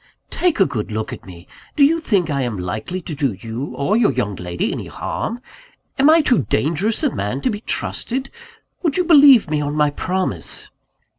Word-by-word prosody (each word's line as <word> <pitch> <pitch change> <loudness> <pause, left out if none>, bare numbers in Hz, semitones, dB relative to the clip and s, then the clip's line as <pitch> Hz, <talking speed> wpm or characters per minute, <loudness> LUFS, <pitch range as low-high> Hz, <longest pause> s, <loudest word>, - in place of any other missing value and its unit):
"Take 355 -8 0
a 195 - +6
good 110 -7 -4
look 110 0 -3
at - - -11
me! 90 -1 -12 0.3
Do 290 - +4
you 325 +4 +4
think 200 - +1
I 140 -1 0
am 120 -5 -2
likely 105 - -4
to 165 - -6
do 140 -5 -1
you 115 +7 -6
or 165 +10 0
your 230 -8 +3
young 115 -6 -2
lady 90 0 -3
any - - -5
harm? 235 +2 -4 0.6
Am 280 +3 +6
I 320 +1 +6
too 240 - +2
dangerous 170 - 0
a 285 - +1
man 105 +7 -2
to 250 - 0
be 210 0 -5
trusted? 260 +3 -2 0.5
Would 325 -4 0
you 365 - +3
believe 285 - +7
me 150 -1 -1
on 145 0 -2
my 150 -1 +2
promise?" 180 - -3
155 Hz, 200 wpm, -20 LUFS, -, 0.6 s, believe